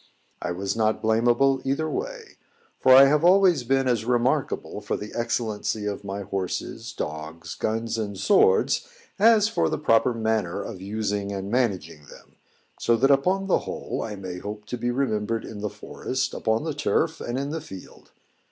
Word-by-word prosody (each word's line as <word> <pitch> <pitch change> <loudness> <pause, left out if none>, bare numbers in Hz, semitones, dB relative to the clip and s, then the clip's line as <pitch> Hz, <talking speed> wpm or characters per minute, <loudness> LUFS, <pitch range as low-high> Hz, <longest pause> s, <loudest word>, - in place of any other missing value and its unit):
I 90 - -2
was 95 +3 -2
not 110 -1 +1
blamable 120 +4 +2
either 140 +4 -1
way; - - -5 0.4
for 130 - +4
I 135 +1 +10
have 150 +3 +3
always 180 -5 +5
been 135 +2 +1
as 120 -3 +1
remarkable 125 -1 0
for 105 - -2
the 105 - -8
excellency 110 -2 -2
of 105 -1 -3
my 100 0 -5
horses, 95 -2 -4
dogs, 80 +2 -6
guns, 115 +1 -2
and 100 -3 -4
swords, 435 - +3 0.3
as 215 0 +6
for 225 - 0
the 155 - -1
proper 120 -4 +3
manner 110 -6 -1
of 90 - -8
using 100 0 -2
and 100 0 -4
managing 90 - -1
them, - - -16 0.4
so 115 - +3
that 135 +5 +3
upon 185 +8 +2
the 195 - +2
whole - - -5
I 105 -2 -4
may 95 -2 -6
hope 105 +2 -7
to 125 - -3
be 120 +1 -1
remembered 115 -4 -1
in 105 - -8
the 105 - -2
forest, 130 +5 -4
upon 110 +3 0
the 160 -1 -2
turf, 160 +2 0
and 120 +1 -3
in 140 +2 -3
the 160 0 -3
field. 95 - -12
115 Hz, 175 wpm, -25 LUFS, 105-140 Hz, 0.4 s, I